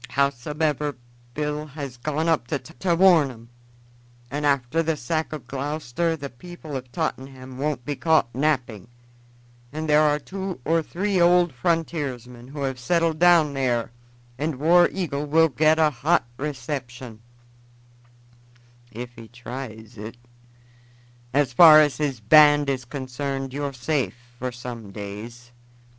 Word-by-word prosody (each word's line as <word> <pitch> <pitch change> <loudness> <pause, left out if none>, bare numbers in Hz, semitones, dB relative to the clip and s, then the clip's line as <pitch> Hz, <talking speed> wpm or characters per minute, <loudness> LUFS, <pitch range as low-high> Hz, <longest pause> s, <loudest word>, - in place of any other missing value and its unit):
Howsomever, 145 +1 -1 0.4
Bill 150 0 -3
has 140 -4 -7
gone 155 +5 -2
on 165 -2 +3
there 145 - -1
to 170 +4 -2
warn 170 -5 +5
'em, 115 -2 -13 0.8
and 145 +1 -1
after 140 +3 +1
the 160 -1 -1
sack 155 +5 -2
of 150 -5 -7
Gloucester 150 +4 -2
the 140 -2 -7
people 160 +1 -10
of 125 -2 -6
Tottenham 130 +1 -5
won't 140 -4 -2
be 145 - -2
caught 160 -6 +2
napping, 125 -8 -1 0.8
and 155 +2 -4
there 150 0 +5
are 150 -1 +3
two 190 +2 -6
or 165 +1 +2
three 185 +3 -1
old 175 -1 +4
frontiersmen 125 -5 -3
who 140 +1 -6
have 130 -2 -3
settled 165 +3 +1
down 170 -4 +5
there, 125 -4 -1 0.5
and 155 0 -1
War 170 +5 +5
Eagle 150 -6 -3
will 160 +2 +4
get 155 +3 +3
a 155 -1 +4
hot 145 +6 +1
reception 130 -5 -6 1.7
if 120 +2 -7
he 115 -1 -12
tries 120 -2 -9
it. 110 +3 -8 1.1
As 140 -1 +1
far 155 +2 +9
as 150 -2 +3
his 140 -5 -2
band 145 +5 +6
is 130 -2 -4
concerned, 135 +1 -4
you're 145 0 -3
safe 135 +1 -2 0.2
for 125 0 -3
some 120 -3 -8
days. 110 +4 -9
145 Hz, 140 wpm, -24 LUFS, 125-155 Hz, 1.7 s, far